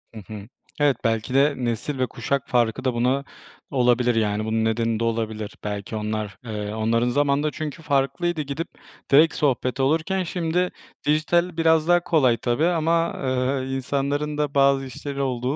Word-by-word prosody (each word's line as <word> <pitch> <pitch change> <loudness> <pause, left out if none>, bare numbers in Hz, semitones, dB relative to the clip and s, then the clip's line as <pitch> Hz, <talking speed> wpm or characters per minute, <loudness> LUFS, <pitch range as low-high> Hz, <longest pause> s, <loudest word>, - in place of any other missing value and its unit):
Hı 110 - -7
hı. 105 -2 -8 0.3
Evet, 145 -2 +3
belki 115 +2 0
de 140 +2 +4
nesil 125 +3 -2
ve 130 - +1
kuşak 140 -2 -2
farkı 120 +1 +1
da 130 - +2
buna 125 +4 +1 0.5
olabilir, 125 -2 +3
yani 105 -1 0
bunun 110 0 0
nedeni 115 0 0
de - - -1
olabilir. 110 -2 -2
Belki 105 +1 -4
onlar, 105 -1 -3
eee, 105 -1 -4
onların 115 +2 +1
zamanında 145 +2 +1
çünkü 155 0 -6
farklıydı. 145 +3 0
Gidip 150 +4 -4 0.4
direkt 155 +4 +6
sohbet 130 -2 0
olurken 165 +7 +1
şimdi 175 +1 -1 0.4
dijital 170 +3 +2
biraz 160 -1 +3
daha 175 0 +5
kolay 135 -9 +3
tabii 120 +6 0
ama, 165 -1 +1
eee, 130 +1 0
insanların 140 +3 -1
da 150 -1 -1
bazı 140 -1 +4
işleri 140 +2 -5
olduğu 130 0 -1
135 Hz, 160 wpm, -23 LUFS, 115-150 Hz, 0.5 s, direkt